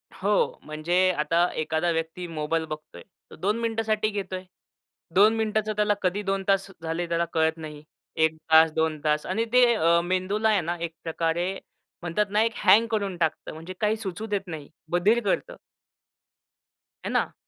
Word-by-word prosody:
हो. 200 +2 0
म्हणजे 175 +5 +1
आता 165 +4 +2
एखादा 160 +2 0
व्यक्ती 165 +2 -3
मोबाईल 160 0 -2
बघतोय. 155 -1 -9 0.4
2 205 +6 0
मिनिटांसाठी 220 -2 0
घेतोय. 195 -3 -4 0.7
2 210 +4 +6
मिनिटांचं 215 -1 0
त्याला 210 0 +2
कधी 185 +3 0
2 195 0 -1
तास 195 0 +2
झाले, 165 +1 -3
त्याला 170 0 0
कळत 160 0 +2
नाही. 150 -2 -9 0.3
1 160 0 +2 0.2
तास, 160 0 +7
2 160 -1 0
तास 150 0 +1
आणि 220 +5 -1
ते 250 0 +7 0.4
मेंदूला 185 +5 0
आहे 210 -3 +3
ना, 170 +1 -3
एक 170 -1 -4
प्रकारे 165 +2 -1 0.5
म्हणतात 175 +4 0
ना, 210 +2 +2
एक 230 0 0
हँग 225 +3 +6
करून 200 -4 -1
टाकतं. 160 -2 -2
म्हणजे 165 +4 -8
काही 215 0 +1
सुचू 210 -1 -5
देत 200 -2 -2
नाही. 155 -4 -7 0.2
बधिर 195 +7 +3
करतं. - - -1 1.5
है - - -2
ना? - - 0
180 Hz, 160 wpm, -26 LUFS, 160-210 Hz, 1.5 s, तास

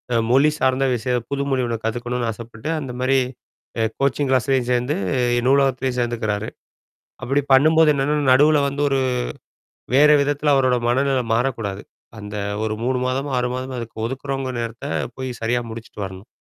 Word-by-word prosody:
அ - - +4
மொழி 140 +4 +5
சார்ந்த 130 +1 +2
விஷயம் 120 0 -2
புது 140 0 -1
மொழி 130 -1 +1
ஒண்ணு 115 -1 -2
கத்துக்கணும்னு 120 +1 -2
ஆசைப்பட்டு 115 +4 -8
அந்த 135 -4 -6
மாரி 135 +1 +3 0.8
கோச்சிங் 140 0 +1
கிளாஸ்லேயும் 130 0 +1
சேர்ந்து, 125 +4 +1 0.5
நூலகத்திலேயும் 135 -2 +2
சேர்ந்துக்கிறாரு. 110 -3 -2 0.7
அப்படி 140 +3 +1
பண்ணும்போது 155 +3 +5
என்னன்னா, 140 +2 0 0.2
நடுவில 150 +3 +5
வந்து 140 +1 -3
ஒரு 135 -1 +2 1.0
வேறு 150 +2 +7
விதத்தில 145 +1 +1
அவரோட 130 -2 +3
மனநிலை 135 +1 +1
மாறக்கூடாது 115 -5 -2 0.4
அந்த 105 0 -7 0.3
ஒரு 110 - -1
3 130 +1 0
மாதம், 135 +3 -2
6 125 - 0
மாதமோ 130 0 -5
அதுக்கு 115 -1 -8
ஒதுக்குறவங்க 135 +1 -4
நேரத்தை 115 0 -5 0.3
போய் 130 0 -4
சரியா 120 +2 +1
முடிச்சிட்டு 110 -2 -9
வரணும். 95 +2 -10
130 Hz, 145 wpm, -21 LUFS, 120-135 Hz, 1.0 s, வேறு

